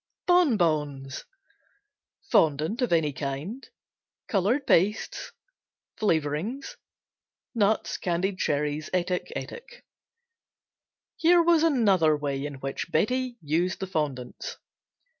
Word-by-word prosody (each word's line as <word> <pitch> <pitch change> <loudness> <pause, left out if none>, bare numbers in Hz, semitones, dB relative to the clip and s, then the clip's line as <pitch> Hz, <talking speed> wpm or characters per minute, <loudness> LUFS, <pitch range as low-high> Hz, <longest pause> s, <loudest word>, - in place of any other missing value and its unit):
Bon 355 -10 +4
Bons 150 -6 -1 1.1
Fondant 155 - +2
of 245 - 0
any 160 -4 +2
kind. 145 - -5 0.6
Color 205 +6 +2
pastes. 210 - +1 0.7
Flavorings. 170 - -1 0.8
Nuts, 215 -2 +1
candied 185 +2 -1
cherries, 150 +1 -1
etc., 180 0 0
etc. 485 - -5 1.6
Here 340 +1 +5
was 335 -1 +4
another 200 - +3
way 140 -2 -3
in 145 -1 -5
which 135 +5 -5
Betsey 245 +9 0
used 170 +5 0
the 190 - -2
fondants. 145 -9 -4
175 Hz, 95 wpm, -27 LUFS, 150-230 Hz, 1.6 s, Here